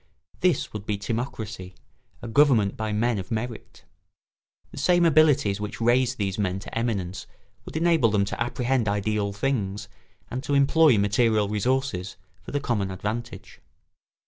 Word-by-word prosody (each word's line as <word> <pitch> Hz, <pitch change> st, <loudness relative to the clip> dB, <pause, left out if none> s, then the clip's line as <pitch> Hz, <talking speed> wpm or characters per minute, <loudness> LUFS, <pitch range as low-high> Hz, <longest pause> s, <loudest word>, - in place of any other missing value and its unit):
This 180 Hz, -6 st, +1 dB
would 105 Hz, -1 st, -7 dB
be 105 Hz, -, -1 dB
timocracy—a 110 Hz, -1 st, -7 dB
government 115 Hz, -5 st, +3 dB
by 110 Hz, -1 st, -3 dB
men 110 Hz, +1 st, 0 dB
of 95 Hz, -, -7 dB
merit. 115 Hz, +1 st, -5 dB, 0.9 s
The -, -, -8 dB
same 175 Hz, +4 st, +3 dB
abilities 145 Hz, -10 st, +3 dB
which 105 Hz, 0 st, -5 dB
raised 125 Hz, +2 st, +2 dB
these 100 Hz, -1 st, -2 dB
men 95 Hz, -2 st, 0 dB
to -, -, -9 dB
eminence 100 Hz, -6 st, -2 dB, 0.4 s
would -, -, -6 dB
enable 165 Hz, -7 st, +3 dB
them 100 Hz, -1 st, +1 dB
to 105 Hz, -, -5 dB
apprehend 120 Hz, -1 st, 0 dB
ideal 100 Hz, 0 st, -1 dB
things 105 Hz, -3 st, -2 dB, 0.4 s
and 125 Hz, -, -3 dB
to 145 Hz, -, -1 dB
employ 140 Hz, -1 st, +5 dB
material 105 Hz, +1 st, +2 dB
resources 105 Hz, -3 st, -1 dB, 0.2 s
for -, -, -11 dB
the 145 Hz, -, 0 dB
common 110 Hz, -8 st, -1 dB
advantage. 110 Hz, +5 st, -6 dB
110 Hz, 145 wpm, -25 LUFS, 100-130 Hz, 0.9 s, employ